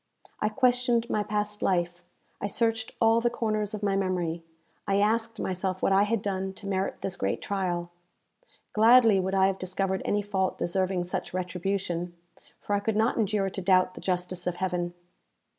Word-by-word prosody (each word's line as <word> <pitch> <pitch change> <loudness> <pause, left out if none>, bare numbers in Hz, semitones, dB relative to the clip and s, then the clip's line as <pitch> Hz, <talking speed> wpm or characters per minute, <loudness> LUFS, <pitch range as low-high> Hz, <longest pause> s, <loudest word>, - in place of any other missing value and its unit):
I 215 - +1
questioned 245 0 +2
my 210 - +1
past 210 0 -2
life; 175 -1 0 0.4
I - - -1
searched 225 +2 0
all 225 0 +4
the 240 - +2
corners 215 -3 -2
of 210 - -8
my 200 -1 +1
memory; 180 -4 -1 0.5
I 195 - +2
asked 225 +2 +1
myself 185 0 -2
what - - +3
I 195 +1 +5
had 225 -2 0
done 190 -1 -2
to 200 - -12
merit 190 -1 -2
this 195 - -2
great 95 - -1
trial? 175 -3 -2 0.8
Gladly 225 -1 +6
would 190 +1 -1
I 190 0 +5
have 195 0 0
discovered 190 +1 -1
any 205 0 0
fault 190 -2 -1
deserving 185 +1 0
such 180 0 -4
retribution, 180 -1 -2 0.4
for 205 - -3
I - - +2
could 210 +1 -1
not 220 +3 +2
endure 205 -3 +1
to 195 - -5
doubt 185 0 +3
the - - -10
justice 180 -1 -2
of 180 - 0
Heaven. 175 -1 -2
195 Hz, 175 wpm, -27 LUFS, 185-215 Hz, 0.8 s, Gladly